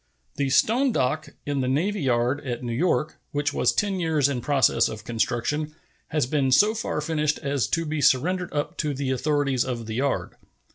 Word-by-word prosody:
The 140 -1 0
stone 245 - +3
dock 155 - -1 0.2
in 145 -2 -1
the 130 - -1
navy 175 +10 0
yard 125 +2 +1
at 125 -2 -4
New 120 -1 -3
York, 155 +2 0 0.2
which 145 0 0
was - - +2
ten 200 -2 -1
years 160 -5 +2
in 135 -4 -2
process 140 0 +3
of 110 -2 -7
construction, 120 +8 -2 0.3
has 150 -4 0
been 135 0 0
so 210 +11 +5
far 225 -8 -3
finished 150 -1 0
as 140 -6 -1
to 165 +6 -1
be 155 -1 -2
surrendered 175 +7 +2
up 145 0 -3
to 150 -2 -1
the 135 -1 -2
authorities 140 -1 +1
of 120 -3 -4
the 110 - -5
yard. 135 +4 -1
145 Hz, 190 wpm, -25 LUFS, 130-155 Hz, 0.3 s, so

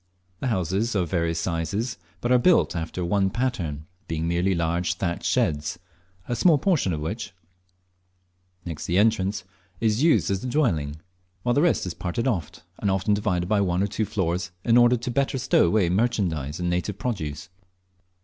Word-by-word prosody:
The 135 - -2
houses 100 +2 0
are 95 - +3
of 85 - -7
various 85 -2 0
sizes, 95 +7 -2 0.2
but 120 - -1
are 125 - +7
all - - +1
built 180 - +3
after 85 +2 -3
one 95 +1 +2
pattern, 95 - -2 0.2
being 80 0 -2
merely 90 +3 +1
large 85 +1 0
thatched 85 -2 -3
sheds, 75 +1 0 0.5
a 120 - -1
small 160 +5 +5
portion 155 - +1
of 75 -2 -2
which, 100 +7 -4 1.3
next 80 -4 -5
the 85 - +1
entrance, 100 -2 +2 0.4
is 110 +1 +1
used 160 -9 +3
as 95 -1 -1
a - - -3
dwelling, 85 - 0 0.5
while 120 - +2
the 145 - +3
rest 170 - +2
is 90 - -4
parted 95 +9 -2
oft; 90 - -2 0.2
and 100 - 0
often 95 +2 +1
divided 90 -4 0
by 105 +1 +2
one 90 -1 +1
or - - +1
two 105 +2 -2
floors, 90 -2 -1
in 115 - +3
order 120 0 +6
better 140 +2 0
to - - -1
stow 130 -8 +3
away 95 +1 +3
merchandise 90 - 0
and 90 - -1
native 90 +3 -1
produce. 75 - -4
95 Hz, 180 wpm, -25 LUFS, 85-115 Hz, 1.3 s, are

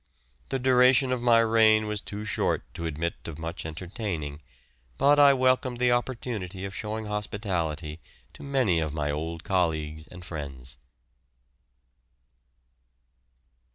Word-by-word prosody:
The 135 - 0
duration 130 0 +4
of 125 -2 0
my 120 -1 +5
reign 110 -1 +4
was 105 -1 -2
too 105 +1 -6
short 105 - 0
to 85 - -4
admit 80 +2 -4
of 80 -3 -6
much 80 0 -5
entertaining, 80 -4 -5 0.6
but 145 - +5
I 140 -1 +8
welcomed 130 -1 +2
the 125 0 +3
opportunity 115 -6 -2
of 95 - -6
showing 110 +1 -4
hospitality 90 -7 -3 0.3
to - - -14
many 130 -11 +1
of 75 -2 -2
my 75 -1 -1
old 80 +3 -4
colleagues 80 -4 -1
and 90 0 -11
friends. 70 -7 -6
100 Hz, 125 wpm, -27 LUFS, 80-120 Hz, 0.6 s, I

